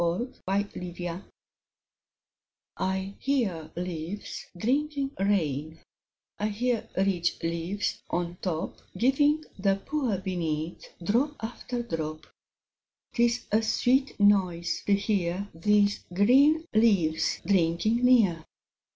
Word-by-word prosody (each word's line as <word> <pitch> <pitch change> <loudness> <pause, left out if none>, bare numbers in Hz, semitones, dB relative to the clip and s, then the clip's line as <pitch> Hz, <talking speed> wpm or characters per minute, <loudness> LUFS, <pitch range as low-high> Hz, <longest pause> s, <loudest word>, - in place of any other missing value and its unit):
Davies 185 +10 -2
The 195 -2 -2
Rain 175 +1 -4 1.6
I 190 +1 -1
HEAR 210 - -1
leaves 175 +2 -5
drinking 275 - 0
rain; 160 -6 0 0.6
I 210 - +1
hear 230 +2 -1
rich 190 -3 +1
leaves 170 +4 -2
on 175 0 -2
top 165 -4 -3 0.2
Giving 290 +5 +3
the 195 0 +3
poor 240 +1 -1
beneath 170 -3 -3 0.2
Drop 250 - +1
after 240 +2 -4
drop; 155 -7 -4 0.9
'Tis 235 0 +2
a 215 +2 +4
sweet 255 +4 +1
noise 185 -4 +3
to 200 - +5
hear 195 -2 -1
These 205 +4 +2
green 275 - +5
leaves 195 -8 +3
drinking 190 +5 +2
near. 215 -10 +4
200 Hz, 100 wpm, -28 LUFS, 170-235 Hz, 1.6 s, to